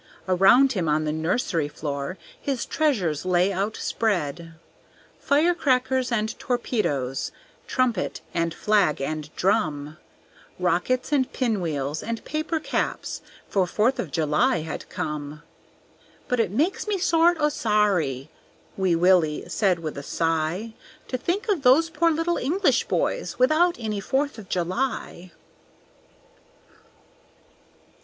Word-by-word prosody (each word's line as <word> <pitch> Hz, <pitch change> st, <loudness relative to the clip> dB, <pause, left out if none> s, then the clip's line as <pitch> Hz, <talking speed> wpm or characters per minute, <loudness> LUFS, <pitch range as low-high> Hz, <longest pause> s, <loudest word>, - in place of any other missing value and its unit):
Around 195 Hz, +9 st, +5 dB
him 175 Hz, -7 st, -1 dB
on 155 Hz, +1 st, +2 dB
the 150 Hz, -, 0 dB
nursery 160 Hz, -, 0 dB
floor 145 Hz, +3 st, -4 dB, 0.2 s
His 270 Hz, -4 st, -2 dB
treasures 200 Hz, -, 0 dB
lay 185 Hz, +1 st, +2 dB
outspread. 180 Hz, -5 st, -2 dB, 0.6 s
Firecrackers 265 Hz, -5 st, +2 dB
and 220 Hz, -1 st, -1 dB
torpedoes, 145 Hz, -, -1 dB, 0.4 s
Trumpet 245 Hz, -7 st, 0 dB
and 165 Hz, 0 st, 0 dB
flag 200 Hz, -2 st, +2 dB
and 150 Hz, +2 st, -3 dB
drum, 155 Hz, -7 st, 0 dB, 0.6 s
Rockets 180 Hz, -, 0 dB
and 270 Hz, -3 st, +1 dB
pinwheels 160 Hz, -, -1 dB
and 230 Hz, 0 st, -5 dB
paper 310 Hz, +2 st, -2 dB
caps, -, -, -3 dB, 0.3 s
For 190 Hz, -3 st, +1 dB
Fourth 225 Hz, +8 st, +1 dB
of 170 Hz, -, -2 dB
July 160 Hz, -, +1 dB
had 155 Hz, 0 st, -6 dB
come. 150 Hz, -1 st, -5 dB, 0.8 s
"But 250 Hz, -, 0 dB
it 225 Hz, -, +2 dB
makes 305 Hz, -, 0 dB
me 415 Hz, -2 st, 0 dB
sort 345 Hz, -1 st, +3 dB
o' 300 Hz, 0 st, +3 dB
sorry," 195 Hz, -, 0 dB, 0.4 s
Wee 190 Hz, -3 st, +2 dB
Willie 170 Hz, -3 st, +3 dB
said 185 Hz, +1 st, +2 dB
with 155 Hz, -4 st, -5 dB
a -, -, -6 dB
sigh, 165 Hz, +8 st, -1 dB, 0.4 s
"To -, -, -2 dB
think 390 Hz, -, -2 dB
of 395 Hz, -8 st, +1 dB
those 285 Hz, +6 st, +5 dB
poor 335 Hz, +1 st, +2 dB
little 330 Hz, +2 st, 0 dB
English 360 Hz, +9 st, +1 dB
boys -, -, -1 dB
Without 310 Hz, +7 st, +4 dB
any 215 Hz, -3 st, -3 dB
Fourth 270 Hz, +5 st, -1 dB
of 195 Hz, -3 st, -12 dB
July." 185 Hz, -1 st, -2 dB
200 Hz, 120 wpm, -24 LUFS, 160-265 Hz, 0.8 s, Around